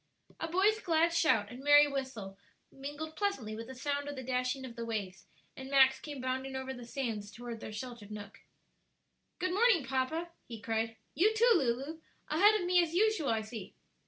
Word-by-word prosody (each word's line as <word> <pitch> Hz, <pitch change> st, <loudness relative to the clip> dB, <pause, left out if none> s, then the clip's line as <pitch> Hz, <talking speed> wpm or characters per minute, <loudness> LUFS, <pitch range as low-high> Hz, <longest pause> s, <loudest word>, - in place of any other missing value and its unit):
A 325 Hz, -, -2 dB
boy's 395 Hz, +6 st, +3 dB
glad 335 Hz, -3 st, +2 dB
shout 225 Hz, -11 st, +3 dB
and 250 Hz, +2 st, -9 dB
merry 290 Hz, 0 st, +8 dB
whistle 260 Hz, -9 st, -4 dB, 0.4 s
mingled 295 Hz, +3 st, -7 dB
pleasantly 290 Hz, -, -2 dB
with 225 Hz, +1 st, -7 dB
the 260 Hz, -, -8 dB
sound 285 Hz, +2 st, -2 dB
of 290 Hz, -, -5 dB
the 260 Hz, -, -6 dB
dashing 255 Hz, +1 st, -1 dB
of 240 Hz, -2 st, -9 dB
the 235 Hz, -, -5 dB
waves, 200 Hz, -6 st, -4 dB, 0.3 s
and 265 Hz, 0 st, -8 dB
Max 265 Hz, -1 st, +5 dB
came 290 Hz, -3 st, -7 dB
bounding 260 Hz, +1 st, -3 dB
over 265 Hz, 0 st, -4 dB
the 245 Hz, -2 st, -9 dB
sands 225 Hz, -6 st, -3 dB
toward 235 Hz, 0 st, -7 dB
their 215 Hz, -, -7 dB
sheltered 230 Hz, -1 st, -7 dB
nook. 210 Hz, -1 st, -9 dB, 1.0 s
"Good 365 Hz, 0 st, -1 dB
morning, 400 Hz, -, +4 dB
papa," 295 Hz, +7 st, -1 dB, 0.2 s
he 230 Hz, -2 st, -7 dB
cried. 225 Hz, +1 st, -2 dB, 0.2 s
"You 430 Hz, +6 st, +3 dB
too, 470 Hz, +2 st, +5 dB
Lulu. 275 Hz, -, 0 dB, 0.3 s
Ahead 410 Hz, +8 st, +5 dB
of 355 Hz, -, -3 dB
me 360 Hz, 0 st, +5 dB
as 335 Hz, -1 st, -2 dB
usual, 430 Hz, -6 st, +2 dB
I 225 Hz, -1 st, +1 dB
see!" 215 Hz, -2 st, -8 dB
265 Hz, 190 wpm, -32 LUFS, 230-320 Hz, 1.0 s, merry